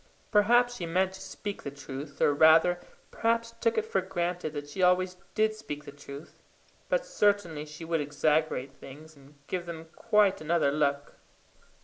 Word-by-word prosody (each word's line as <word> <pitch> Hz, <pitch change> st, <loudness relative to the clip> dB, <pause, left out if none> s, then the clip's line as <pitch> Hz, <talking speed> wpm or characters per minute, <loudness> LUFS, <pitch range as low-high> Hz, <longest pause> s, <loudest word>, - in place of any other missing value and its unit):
Perhaps 240 Hz, +3 st, +4 dB
she 175 Hz, -, -4 dB
meant 185 Hz, +3 st, +1 dB
to 190 Hz, -, -10 dB
speak 205 Hz, -1 st, -6 dB
the -, -, -5 dB
truth, 140 Hz, +1 st, -8 dB
or 145 Hz, -, +4 dB
rather, 160 Hz, +4 st, +5 dB, 0.3 s
perhaps 230 Hz, 0 st, 0 dB
took 230 Hz, -1 st, +1 dB
it 220 Hz, -, +1 dB
for 195 Hz, -3 st, 0 dB
granted 175 Hz, -3 st, -3 dB
that 145 Hz, -1 st, -5 dB
she 145 Hz, +6 st, -5 dB
always 180 Hz, 0 st, +3 dB, 0.2 s
did 215 Hz, 0 st, +2 dB
speak 150 Hz, -9 st, -7 dB
the -, -, -8 dB
truth; 140 Hz, +2 st, -11 dB, 0.5 s
but -, -, +1 dB
certainly 200 Hz, -, +1 dB
she 150 Hz, +2 st, -9 dB
would 165 Hz, -1 st, 0 dB
exaggerate 145 Hz, -2 st, 0 dB
things, 155 Hz, +4 st, -13 dB
and 140 Hz, +1 st, -19 dB
give 180 Hz, +1 st, -4 dB
them 165 Hz, -1 st, -8 dB
quite 205 Hz, -4 st, +3 dB
another 155 Hz, -2 st, +2 dB
look. 145 Hz, -1 st, -1 dB
170 Hz, 165 wpm, -29 LUFS, 145-205 Hz, 0.5 s, rather